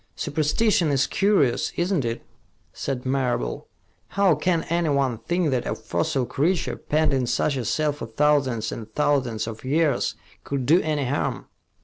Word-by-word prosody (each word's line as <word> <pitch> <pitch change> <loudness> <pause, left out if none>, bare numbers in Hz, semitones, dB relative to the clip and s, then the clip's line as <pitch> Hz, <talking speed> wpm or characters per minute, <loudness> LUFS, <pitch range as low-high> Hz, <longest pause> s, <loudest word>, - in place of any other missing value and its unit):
"Superstition 160 +4 +1
is 135 -1 +2
curious, 195 - +2
isn't 175 -3 0
it?" 115 0 -3 0.5
said 130 -2 -4
Marable. 130 - -1 0.4
"How 200 -3 +3
can 165 +2 0
anyone 140 -8 0
think 175 0 0
that 125 -2 -1
a - - -1
fossil 130 -2 -1
creature, 160 +8 0
penned 155 -1 0
in 130 -2 0
such 145 +4 +1
a 130 - -2
cell 155 +6 +1
for 145 - -7
thousands 130 -3 +1
and 110 -1 -7
thousands 135 -7 +1
of 110 -1 -7
years, 150 +3 +1 0.3
could 140 -3 -3
do 165 +8 +5
any 150 -3 -1
harm?" 140 +4 -2
145 Hz, 150 wpm, -24 LUFS, 125-160 Hz, 0.5 s, do